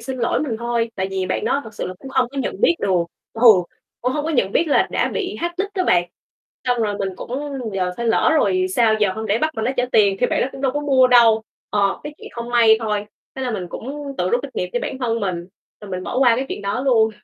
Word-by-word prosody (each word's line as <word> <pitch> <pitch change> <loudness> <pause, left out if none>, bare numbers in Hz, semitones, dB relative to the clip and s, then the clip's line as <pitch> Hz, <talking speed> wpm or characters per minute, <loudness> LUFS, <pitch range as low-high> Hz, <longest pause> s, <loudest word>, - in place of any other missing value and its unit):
xin 255 +3 -5
lỗi 235 - +1
mình 250 -7 -2
thôi, 235 -1 -1
tại 190 -2 -2
vì 190 -1 -2
bạn - - -2
đó 280 - +1
thật 220 -1 -11
sự - - -4
là 185 - -6
cũng 270 - -10
không 260 -2 +1
có 275 +2 -7
nhận - - -3
biết 480 -8 +4
được, 185 -3 +2 0.3
ừ, 225 - -8 0.6
cũng 250 +1 0
hông 295 +2 -2
có 320 - -1
nhận 205 -9 +1
biết 335 - +2
là 285 - +3
đã - - +1
bị 380 -3 -3
hack 345 +1 -3
nick 400 +1 -2
đó 370 -2 0
bạn. 175 - +3 0.6
Xong 245 -2 +1
rồi 205 -2 -1
mình 195 - -1
cũng - - -9 0.4
giờ 185 -1 0
phải 235 - -3
lỡ 225 - +3
rồi 370 +4 +2
sao 225 -2 +4
giờ, 200 -3 +3
hông 220 - -5
lẽ 210 +2 +1
bắt 310 +5 +1
bạn 220 - -2
đó 245 - +1
trả 245 - +2
tiền 200 -3 +4
thì 245 - +4
bạn - - 0
đó - - 0
cũng 270 - -9
đâu 265 -2 +1
có 290 - -1
mua 270 -3 +4
đâu. 230 -3 +5 0.3
Ờ, 200 -1 +1
cái 295 - -6
chuyện - - -10
không 235 0 -6
may 230 -2 +6
thôi, 210 -2 -2 0.3
thế 265 - -5
là 255 - -1
mình 195 -6 -3
cũng 280 +7 -6
tự 180 +1 0
rút 245 - +2
kinh 280 - -6
nghiệm 180 - -2
cho - - 0
bản 265 - -4
thân 230 -3 -1
mình 180 -3 -3 0.3
rồi 205 -2 -10
mình 185 0 -4
bỏ 250 - -2
qua 245 -3 +5
cái 265 +2 -2
chuyện - - -5
đó 200 +6 -2
luôn. 230 -5 +3
235 Hz, 280 wpm, -21 LUFS, 205-265 Hz, 0.6 s, may